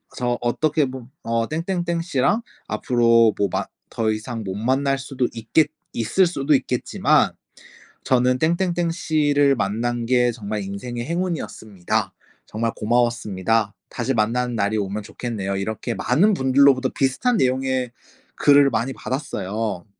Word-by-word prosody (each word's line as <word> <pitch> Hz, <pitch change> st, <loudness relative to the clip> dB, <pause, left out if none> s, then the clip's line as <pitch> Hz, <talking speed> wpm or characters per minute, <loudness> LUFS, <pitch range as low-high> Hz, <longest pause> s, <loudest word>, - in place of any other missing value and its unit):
저 120 Hz, -1 st, -1 dB
어떻게 150 Hz, +5 st, +1 dB
보 130 Hz, -2 st, -8 dB, 0.2 s
어, 115 Hz, 0 st, 0 dB
"땡땡땡 170 Hz, +1 st, -2 dB
씨랑 165 Hz, -, +1 dB, 0.3 s
앞으로 115 Hz, 0 st, +3 dB
뭐 100 Hz, -, +2 dB
만 -, -, -2 dB, 0.3 s
더 110 Hz, -1 st, 0 dB
이상 110 Hz, +1 st, -4 dB
못 95 Hz, -2 st, -4 dB
만날 135 Hz, +5 st, +1 dB
수도 130 Hz, -2 st, -2 dB
있겠 115 Hz, +7 st, +1 dB, 0.3 s
있을 150 Hz, -, +2 dB
수도 150 Hz, -3 st, 0 dB
있겠지만 125 Hz, -2 st, +1 dB, 0.7 s
저는 125 Hz, -1 st, +2 dB
땡땡땡 170 Hz, +1 st, +1 dB
씨를 145 Hz, -4 st, +2 dB
만난 120 Hz, +3 st, -1 dB
게 125 Hz, 0 st, +3 dB
정말 105 Hz, -2 st, -4 dB
인생의 120 Hz, +5 st, -5 dB
행운이었습니다. 155 Hz, -, -3 dB, 0.3 s
정말 115 Hz, +1 st, -2 dB
고마웠습니다. 115 Hz, -3 st, 0 dB, 0.2 s
다시 125 Hz, +2 st, -2 dB
만나는 120 Hz, +2 st, 0 dB
날이 105 Hz, 0 st, 0 dB
오면 100 Hz, +1 st, -3 dB
좋겠네요." 105 Hz, -3 st, -4 dB
이렇게 110 Hz, +4 st, -3 dB
많은 205 Hz, +6 st, +3 dB
분들로부터 130 Hz, -1 st, +4 dB
비슷한 180 Hz, -, +1 dB
내용의 130 Hz, -, 0 dB, 0.4 s
글을 145 Hz, -1 st, +5 dB
많이 120 Hz, +2 st, -1 dB
받았어요. 110 Hz, -, -4 dB
125 Hz, 305 characters per minute, -22 LUFS, 110-140 Hz, 0.7 s, 글을